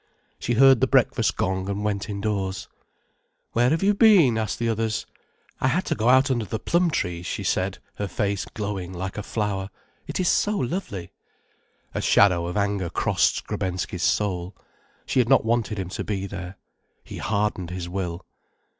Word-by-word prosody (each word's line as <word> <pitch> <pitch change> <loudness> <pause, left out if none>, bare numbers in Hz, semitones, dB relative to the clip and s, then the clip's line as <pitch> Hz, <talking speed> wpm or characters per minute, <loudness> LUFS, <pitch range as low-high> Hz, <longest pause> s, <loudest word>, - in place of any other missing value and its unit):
She 120 - -1
heard 135 0 +6
the 130 - +4
breakfast 125 -3 +2
gong 95 +1 -1
and 100 +1 -2
went 105 -1 -2
indoors. 100 -2 -2 0.8
"Where 120 +2 +3
have 160 +5 +1
you 205 +1 +4
been?" 195 - +6
asked 110 -2 -2
the 120 - -1
others. 110 0 -1 0.5
"I - - +1
had 165 +8 +1
to - - 0
go 115 +2 +1
out 130 +2 +5
under 120 -3 0
the 110 - -3
plum 175 +8 +1
trees," 90 - -2
she - - -3
said, - - 0 0.2
her 100 - -2
face 100 +1 -1
glowing 100 -4 -5
like 95 +2 -5
a 105 - -3
flower. 100 -2 -2 0.4
"It - - -3
is 185 - +1
so 210 +4 +2
lovely." 120 - -3 0.8
A - - -2
shadow 85 -4 +4
of 90 - -3
anger 100 -3 0
crossed - - +2
Skrebensky's 90 -1 -3
soul. 90 +2 0 0.5
She - - +1
had 120 -1 +2
not 135 -4 +5
wanted 115 -2 0
him 95 -2 -4
to - - -4
be 100 -2 -3
there. 95 -1 -7 0.5
He - - -9
hardened 100 -4 -1
his 90 -1 -5
will. 90 -1 -4
105 Hz, 175 wpm, -24 LUFS, 95-120 Hz, 0.8 s, heard